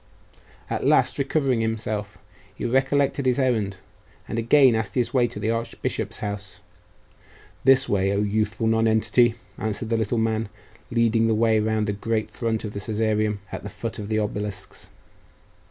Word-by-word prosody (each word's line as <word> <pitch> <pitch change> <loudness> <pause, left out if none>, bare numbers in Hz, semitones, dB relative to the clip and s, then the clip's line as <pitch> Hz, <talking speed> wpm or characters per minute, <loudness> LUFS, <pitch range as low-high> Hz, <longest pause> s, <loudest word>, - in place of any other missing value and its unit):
At - - -3
last, - - +3
recovering 135 -3 +1
himself, 110 -2 -3 0.4
he - - -5
recollected 135 +2 +1
his 125 - +3
errand, 110 -8 0 0.5
and 115 - -2
again 130 +2 +5
asked 110 -2 -2
his 120 -2 0
way 125 -2 +3
to 115 -3 -8
the 110 +2 0
archbishop's 115 0 -3
house. 100 -3 -5 1.1
'This 135 0 +6
way, 95 -1 +1
O 100 +1 +1
youthful 110 +1 0
nonentity!' 110 +1 +3 0.2
answered 110 +1 -3
the 115 - +2
little 110 +2 -1
man, 110 -1 0 0.4
leading 115 -1 +2
the 110 - +2
way 110 0 +3
round 110 0 0
the 105 - -1
great 110 +2 -2
front 115 -2 -2
of 105 -1 -5
the 100 - -4
Caesareum, 110 -1 0
at - - -5
the 105 - -7
foot 105 +3 -6
of 105 0 -6
the 110 - +1
obelisks. 105 -1 -4
110 Hz, 160 wpm, -24 LUFS, 105-115 Hz, 1.1 s, This